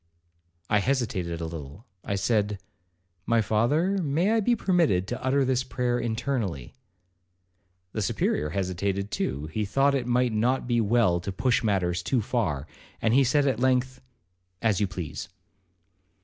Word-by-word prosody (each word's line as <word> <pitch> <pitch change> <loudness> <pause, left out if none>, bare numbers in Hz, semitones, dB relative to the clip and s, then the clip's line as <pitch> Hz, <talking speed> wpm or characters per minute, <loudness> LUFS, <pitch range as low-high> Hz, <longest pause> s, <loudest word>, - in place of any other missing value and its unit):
I 105 +2 +3
hesitated 100 -9 -1
a - - -2
little. 80 - -8 0.2
I 100 - -2
said, 105 0 +1 0.7
'My 115 0 +3
father, 140 - +1
may 165 +5 +1
I 225 - +3
be 240 +3 +2
permitted 170 - +2
to 125 +3 -5
utter 135 +1 +2
this 130 -1 +1
prayer 125 -1 -1
internally?' 115 - -2 1.2
The 110 - -3
Superior 75 -5 0
hesitated 95 +3 -2
too; 70 -5 -2
he 110 - 0
thought 135 +8 +2
it 130 -3 -1
might 125 -1 +2
not 120 +5 +1
be 120 -1 +1
well 105 -5 +3
to 95 +3 -5
push 120 +6 +1
matters 90 -4 +1
too 120 +5 0
far, 90 - -1 0.3
and 115 - +1
he 135 +2 +5
said 140 +3 +2
at 130 -5 +1
length, 130 0 +1 0.6
'As 110 -3 +1
you 100 - +2
please.' 85 -3 -6
115 Hz, 150 wpm, -26 LUFS, 95-130 Hz, 1.2 s, he